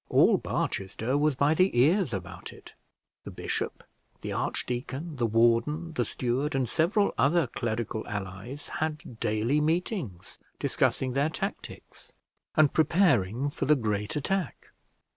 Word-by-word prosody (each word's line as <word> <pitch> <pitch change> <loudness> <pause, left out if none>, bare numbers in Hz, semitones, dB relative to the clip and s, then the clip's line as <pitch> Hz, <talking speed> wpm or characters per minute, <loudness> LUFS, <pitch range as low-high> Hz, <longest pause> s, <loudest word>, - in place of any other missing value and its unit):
All - - +5
Barchester 110 +7 -2
was 150 0 +2
by 140 +4 +3
the 185 -2 +2
ears 165 - +4
about 95 -3 -6
it. - - -14 0.5
The - - -7
bishop, - - -3 0.4
the - - -4
archdeacon, 135 +5 -3
the 120 -2 +1
warden, 120 +9 +2
the 125 -5 0
steward, 135 +5 -1
and 130 -2 +1
several 185 - +2
other 150 +6 +4
clerical 110 -2 -3
allies, 105 +7 -6
had 155 -7 -4
daily 110 +8 +1
meetings, 160 - -2 0.2
discussing 130 -1 0
their 140 +3 +2
tactics, - - -7 0.4
and 155 -2 +4
preparing 145 - +2
for - - -3
the 150 - +6
great 105 -5 -2
attack. 175 +2 -2
135 Hz, 130 wpm, -28 LUFS, 115-155 Hz, 0.5 s, the